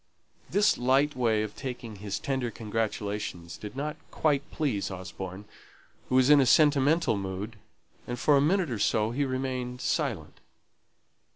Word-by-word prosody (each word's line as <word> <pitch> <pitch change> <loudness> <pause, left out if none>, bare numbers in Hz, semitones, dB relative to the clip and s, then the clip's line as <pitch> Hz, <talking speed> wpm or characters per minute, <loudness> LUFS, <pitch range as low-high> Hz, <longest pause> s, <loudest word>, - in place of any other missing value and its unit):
This 205 +1 +3
light 135 +4 +3
way 115 -4 +2
of 105 -1 -6
taking 120 -5 -6
his 100 0 -4
tender 130 -3 -2
congratulation 105 -5 -3
did 105 +3 -8
not 150 +2 -3
quite 145 -2 0
please 130 -11 -1
Osborne, 95 +1 -7 0.6
who 130 - +1
was 130 +2 +5
in 145 -1 +8
a - - +4
sentimental 150 +1 +4
mood, 100 +3 -5 0.5
and 120 - -3
for 145 +4 +4
a 140 - +5
minute 170 0 +2
or 115 - -2
so 110 +1 +2
he 140 +4 0
remained 130 -1 -3
silent. - - -2
125 Hz, 150 wpm, -28 LUFS, 105-140 Hz, 0.6 s, in